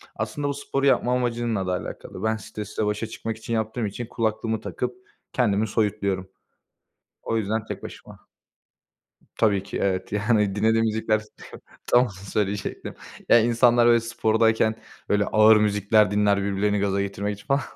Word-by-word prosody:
aslında 110 +7 -3
bu 140 - -1
sporu 140 0 -2
yapma 125 -2 +3
amacınla 120 -5 -1
da - - 0
alakalı. 90 +3 -6
Ben 110 0 +1
stresle 105 0 -5
başa 105 +2 -2
çıkmak 115 0 -5
için 115 +1 -6
yaptığım 110 +1 -1
için 105 +4 -5
kulaklığımı 110 -1 -2
takıp 125 -1 -4 0.4
kendimi 110 -3 +1
soyutluyorum. 100 -3 -1 0.9
O 115 - -1
yüzden 110 +1 -1
tek - - -7
başıma. - - -11 1.1
Tabii 100 -3 +2
ki, 100 - -6
evet, 95 -1 -1
yani 105 -1 +1
dinlediğim 110 +2 +2
müzikler 110 0 +1
s 110 - -14 0.6
tam 120 - +5
onu 125 - -4
söyleyecektim. 100 +1 -4 0.3
Ya, 120 - +7
insanlar, 120 +1 +4
böyle, 120 0 +6
spordayken, 110 -1 +1 0.3
böyle, 105 0 +2
ağır 110 +1 +6
müzikler 105 0 +3
dinler, 105 -1 +2
birbirlerini 100 +1 0
gaza 100 0 0
getirmek 100 +1 -3
için 100 - -17
falan. 140 +1 +2
110 Hz, 150 wpm, -24 LUFS, 100-115 Hz, 1.1 s, Ya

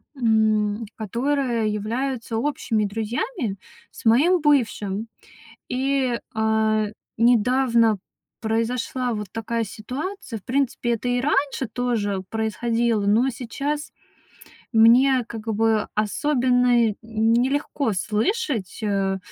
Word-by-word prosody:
м, 220 -2 +2
которые 235 0 -1
являются 230 +2 -3
общими 225 -4 0
друзьями 225 - -3 0.3
с - - -14
моим 310 +11 +5
бывшим. 225 -7 +1 0.6
И, 260 -1 0 0.2
а, 220 -1 +2 0.3
недавно 235 -1 +3 0.4
произошла 230 +2 -1
вот 210 -1 -4
такая 225 +1 -2
ситуация. 255 - -6
В 200 - -24
принципе, 260 -2 0
это 235 +2 -2
и 245 0 +1
раньше 275 -1 0
тоже 220 -6 -1
происходило, 225 0 0
но 225 +6 +3
сейчас 280 +5 -4 0.8
мне 245 +2 +5
как 225 -1 -8
бы 220 0 +1
особенно 245 0 +2
нелегко 235 +4 0
слышать, 220 - -1
а, 195 -2 0
230 Hz, 95 wpm, -23 LUFS, 220-260 Hz, 0.8 s, моим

